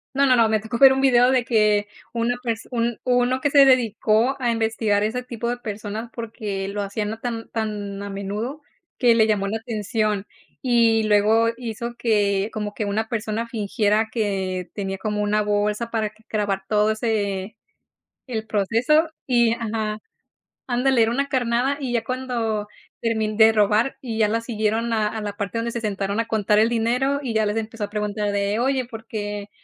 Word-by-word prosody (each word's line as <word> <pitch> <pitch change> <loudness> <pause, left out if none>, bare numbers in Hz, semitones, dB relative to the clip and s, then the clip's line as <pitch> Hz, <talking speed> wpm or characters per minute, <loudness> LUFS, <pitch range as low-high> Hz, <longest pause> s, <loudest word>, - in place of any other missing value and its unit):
No, 280 +1 +4
no, 255 -2 +5
no, 225 -2 +4
me 215 -1 +2
tocó 220 +3 -4
ver 270 +1 +8
un 265 - +1
video 250 -1 +5
de 250 -2 +2
que, 210 -2 +2 0.2
una 235 +1 0
perso 225 -2 -3
un 235 -1 0
uno 250 +1 +2
que 290 +2 +1
se 280 0 +7
dedicó 240 -1 +3
a 240 -1 +2
investigar 220 -2 +1
ese 245 +4 -2
tipo 235 -1 -5
de 245 - 0
personas 215 0 -6
porque 215 -4 -4
lo 205 +1 -3
hacían 210 +2 -3
tan 230 -2 -4
tan 205 -3 -4
a 200 - -5
menudo, 210 +9 -4 0.4
que 240 -3 +4
le 220 -1 +5
llamó 205 -2 +1
la 220 +3 -1
atención. 215 -2 -2 0.4
Y 230 -3 +3
luego 215 +2 +4
hizo 235 0 -5
que, 205 -2 +1
como 210 -1 -4
que 215 - -3
una 215 +2 -1
persona 225 0 -3
fingiera 215 0 0
que, 190 -5 -2
tenía 195 -2 -3
como 210 0 -2
una 210 0 +1
bolsa 210 +2 0
para 215 -2 -1 0.2
grabar 205 -3 -1
todo 210 +1 +2
ese 210 -3 -2 0.7
el 220 -3 -3
proceso 230 - +2 0.2
y 235 -3 +3
Ajá, 220 -2 -3 0.7
ándale 250 0 +2
era 225 - +2
una 280 +3 0
carnada 255 +1 +1
y 255 -3 -3
ya 235 - +1
cuando, 235 -4 -2 0.4
termin 220 -2 0
de 225 0 +7
robar 215 +4 +2
y 235 -4 -5
ya 215 - +3
la 225 +2 0
siguieron 230 0 -1
a 215 -1 +1
a 220 0 -5
la 205 -1 -4
parte 205 +2 -3
donde 235 +1 -2
se 235 -1 -4
sentaron 200 0 -2
a 230 - -1
contar 210 -1 +2
el 225 +2 +4
dinero 250 +5 +1
y 235 -4 -3
ya 220 0 +2
les 210 +2 0
empezó 225 -1 -4
a 205 - -6
preguntar 210 0 -2
de: 200 +2 0
"Oye, 260 0 +1
¿por 225 -1 -10
qué? 205 -1 -5
220 Hz, 185 wpm, -23 LUFS, 210-235 Hz, 0.7 s, ver